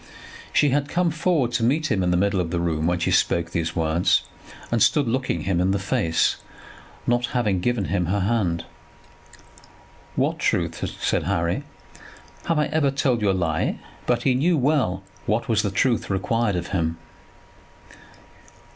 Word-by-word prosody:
She 145 Hz, -, +3 dB
had 140 Hz, +1 st, 0 dB
come 175 Hz, -1 st, +1 dB
forward 160 Hz, -6 st, +1 dB
to 120 Hz, -1 st, 0 dB
meet 145 Hz, +5 st, +1 dB
him 100 Hz, -4 st, +2 dB
in 90 Hz, -, +1 dB
the 90 Hz, -, +2 dB
middle 100 Hz, +1 st, +1 dB
of 85 Hz, -2 st, -1 dB
the 85 Hz, 0 st, -1 dB
room 80 Hz, -2 st, 0 dB
when 90 Hz, 0 st, +1 dB
she 85 Hz, -, 0 dB
spoke 85 Hz, 0 st, +1 dB
these 85 Hz, -1 st, -2 dB
words, 80 Hz, +1 st, +2 dB, 0.5 s
and 115 Hz, -1 st, +1 dB
stood 145 Hz, +2 st, +3 dB
looking 120 Hz, -8 st, -1 dB
him 90 Hz, +1 st, 0 dB
in 90 Hz, -, +2 dB
the 100 Hz, -, +2 dB
face, 90 Hz, -4 st, +1 dB, 0.7 s
not 120 Hz, 0 st, +1 dB
having 105 Hz, -6 st, +1 dB
given 120 Hz, +1 st, 0 dB
him 90 Hz, -1 st, -1 dB
her 100 Hz, +3 st, 0 dB
hand. 95 Hz, -5 st, 0 dB, 1.5 s
"What -, -, 0 dB
truth?" -, -, 0 dB, 0.2 s
said -, -, 0 dB
Harry. 85 Hz, -2 st, -1 dB, 0.8 s
"Have 165 Hz, -, +1 dB
I 150 Hz, -, +3 dB
ever 155 Hz, -2 st, +2 dB
told 135 Hz, -4 st, 0 dB
you 105 Hz, -, +2 dB
a -, -, +3 dB
lie?" 85 Hz, -4 st, -1 dB, 0.3 s
But 120 Hz, -1 st, +1 dB
he 130 Hz, -, +3 dB
knew 160 Hz, +7 st, +2 dB
well 130 Hz, -10 st, +1 dB, 0.2 s
what 110 Hz, +2 st, 0 dB
was 110 Hz, -2 st, +2 dB
the 105 Hz, -, -1 dB
truth 115 Hz, +5 st, 0 dB
required 100 Hz, +2 st, 0 dB
of 90 Hz, 0 st, -3 dB
him. 80 Hz, -3 st, -1 dB
100 Hz, 170 wpm, -23 LUFS, 90-125 Hz, 1.5 s, She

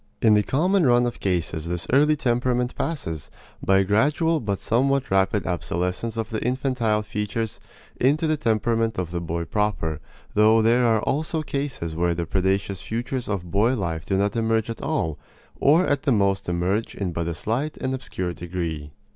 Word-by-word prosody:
In 110 Hz, -, +5 dB
the 105 Hz, -, +5 dB
common 180 Hz, -, +2 dB
run 120 Hz, 0 st, +4 dB
of 120 Hz, -, -3 dB
cases 85 Hz, -4 st, -1 dB
this 85 Hz, 0 st, -2 dB
early 150 Hz, +3 st, +5 dB
temperament 125 Hz, -2 st, 0 dB
passes, 80 Hz, -, -4 dB, 0.3 s
by 95 Hz, -, +4 dB
a 95 Hz, -, +4 dB
gradual 150 Hz, -, +2 dB
but 100 Hz, -5 st, -2 dB
somewhat 135 Hz, +5 st, +1 dB
rapid 95 Hz, +1 st, +2 dB
obsolescence 90 Hz, +5 st, -2 dB
of 115 Hz, 0 st, -3 dB
the 110 Hz, -, -2 dB
infantile 125 Hz, -4 st, 0 dB
features, 105 Hz, +1 st, -3 dB, 0.4 s
into 145 Hz, +5 st, +2 dB
the 155 Hz, 0 st, +2 dB
temperament 115 Hz, -3 st, 0 dB
of 90 Hz, -3 st, -3 dB
the 85 Hz, -1 st, -2 dB
boy 85 Hz, 0 st, -3 dB
proper; 105 Hz, -8 st, -1 dB, 0.3 s
though 110 Hz, +1 st, +5 dB
there 120 Hz, +2 st, +4 dB
are 110 Hz, -2 st, +2 dB
also 155 Hz, +2 st, -1 dB
cases 140 Hz, -, -3 dB
where 85 Hz, +1 st, +1 dB
the 85 Hz, 0 st, -2 dB
predaceous 95 Hz, 0 st, 0 dB
futures 120 Hz, +2 st, -3 dB
of 90 Hz, -4 st, -3 dB
boy 110 Hz, +6 st, +3 dB
life 85 Hz, -7 st, -3 dB
do 95 Hz, -, 0 dB
not 100 Hz, +3 st, 0 dB
emerge 115 Hz, 0 st, +1 dB
at 115 Hz, -, -7 dB
all, 80 Hz, -2 st, -1 dB, 0.4 s
or 160 Hz, +6 st, +5 dB
at 145 Hz, -1 st, +1 dB
the 140 Hz, -, +1 dB
most 100 Hz, -4 st, +1 dB
emerge 90 Hz, +5 st, -1 dB
in 95 Hz, -3 st, -2 dB
but 85 Hz, 0 st, -3 dB
a 85 Hz, -, -2 dB
slight 130 Hz, -, -2 dB
and 130 Hz, -, -2 dB
obscure 95 Hz, -9 st, -4 dB
degree. 85 Hz, -4 st, -4 dB
110 Hz, 180 wpm, -24 LUFS, 90-125 Hz, 0.4 s, In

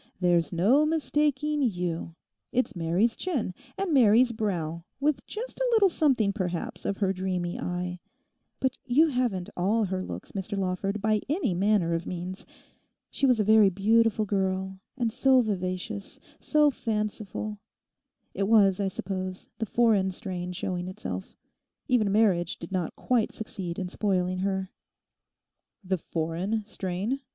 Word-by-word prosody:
'There's 175 Hz, -3 st, +2 dB
no 215 Hz, -, +4 dB
mistaking 300 Hz, -1 st, +1 dB
you. 175 Hz, -8 st, -2 dB, 0.4 s
It's 255 Hz, -3 st, 0 dB
Mary's 175 Hz, +7 st, +1 dB
chin, 280 Hz, -, -2 dB, 0.2 s
and 390 Hz, -4 st, -1 dB
Mary's 240 Hz, -1 st, +6 dB
brow—with 210 Hz, -, -2 dB
just 475 Hz, +4 st, -6 dB
a -, -, +1 dB
little 415 Hz, -4 st, +6 dB
something, 260 Hz, -, +2 dB
perhaps, 180 Hz, -4 st, -3 dB
of 200 Hz, -, -1 dB
her 195 Hz, -2 st, +1 dB
dreamy 180 Hz, -2 st, -2 dB
eye. 180 Hz, 0 st, -3 dB, 0.6 s
But 260 Hz, -1 st, -1 dB
you 300 Hz, +6 st, +5 dB
haven't 225 Hz, -8 st, -1 dB
all 205 Hz, +6 st, +2 dB
her 190 Hz, -2 st, -2 dB
looks, -, -, -7 dB
Mr 200 Hz, +1 st, -4 dB
Lawford, 195 Hz, +2 st, -2 dB
by 215 Hz, -1 st, +2 dB
any 295 Hz, -, +1 dB
manner 190 Hz, -2 st, +2 dB
of 165 Hz, 0 st, -2 dB
means. 180 Hz, +1 st, -5 dB, 0.6 s
She 275 Hz, -, +2 dB
was 250 Hz, -3 st, +4 dB
a -, -, +4 dB
very 215 Hz, -1 st, +6 dB
beautiful 215 Hz, +3 st, +3 dB
girl, 190 Hz, -1 st, -1 dB, 0.2 s
and 235 Hz, -3 st, 0 dB
so 260 Hz, +2 st, +4 dB
vivacious, 195 Hz, -1 st, -3 dB, 0.2 s
so 300 Hz, -1 st, +3 dB
fanciful—it 210 Hz, -3 st, -5 dB
was, 200 Hz, -4 st, +5 dB
I 200 Hz, -, +1 dB
suppose 185 Hz, 0 st, -4 dB
the 225 Hz, -, -2 dB
foreign 215 Hz, -4 st, +3 dB
strain 180 Hz, -2 st, -5 dB
showing 180 Hz, 0 st, -3 dB
itself. 95 Hz, -, -6 dB, 0.5 s
Even 220 Hz, -5 st, +2 dB
marriage 195 Hz, -5 st, +2 dB
did 170 Hz, -, -9 dB
not 180 Hz, -4 st, -2 dB
quite 245 Hz, -3 st, +1 dB
succeed 190 Hz, -6 st, -5 dB
in 185 Hz, -, -2 dB
spoiling 185 Hz, -2 st, 0 dB
her.' 190 Hz, 0 st, -1 dB, 1.1 s
'The 185 Hz, -1 st, -1 dB
foreign 170 Hz, +8 st, -2 dB
strain? 200 Hz, +6 st, -3 dB
200 Hz, 140 wpm, -27 LUFS, 180-230 Hz, 1.1 s, Mary's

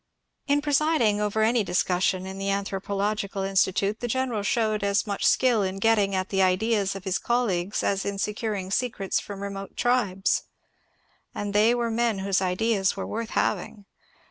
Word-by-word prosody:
In 290 Hz, 0 st, +2 dB
presiding 290 Hz, -8 st, +2 dB
over 210 Hz, +1 st, +1 dB
any 230 Hz, 0 st, +3 dB
discussion 185 Hz, 0 st, 0 dB
in 190 Hz, 0 st, -7 dB
the 195 Hz, 0 st, -2 dB
Anthropological 200 Hz, 0 st, -2 dB
In 195 Hz, 0 st, -3 dB
stitute 195 Hz, +3 st, +2 dB
the 240 Hz, -, -3 dB
general 245 Hz, -3 st, -1 dB
showed 215 Hz, 0 st, 0 dB
as 200 Hz, 0 st, +1 dB
much 200 Hz, -2 st, -3 dB
skill 245 Hz, -4 st, +3 dB
in 190 Hz, 0 st, -2 dB
getting 205 Hz, -2 st, +2 dB
at 185 Hz, 0 st, -2 dB
the 195 Hz, -1 st, +1 dB
ideas 195 Hz, +2 st, +1 dB
of 195 Hz, -, -7 dB
his 190 Hz, -1 st, -1 dB
colleagues 205 Hz, -6 st, 0 dB
as 195 Hz, -1 st, 0 dB
in 200 Hz, 0 st, -3 dB
securing 205 Hz, -2 st, -3 dB
secrets 215 Hz, -4 st, -1 dB
from 200 Hz, -1 st, -8 dB
remote 195 Hz, 0 st, -7 dB
tribes. 215 Hz, -6 st, +1 dB, 0.9 s
And 205 Hz, -1 st, -3 dB
they 220 Hz, +3 st, +4 dB
were 235 Hz, -1 st, -1 dB
men 230 Hz, -2 st, +1 dB
whose 195 Hz, 0 st, 0 dB
ideas 195 Hz, +1 st, +1 dB
were 195 Hz, -, -3 dB
worth 230 Hz, +1 st, -4 dB
having. 215 Hz, -2 st, -1 dB
200 Hz, 170 wpm, -26 LUFS, 195-225 Hz, 0.9 s, they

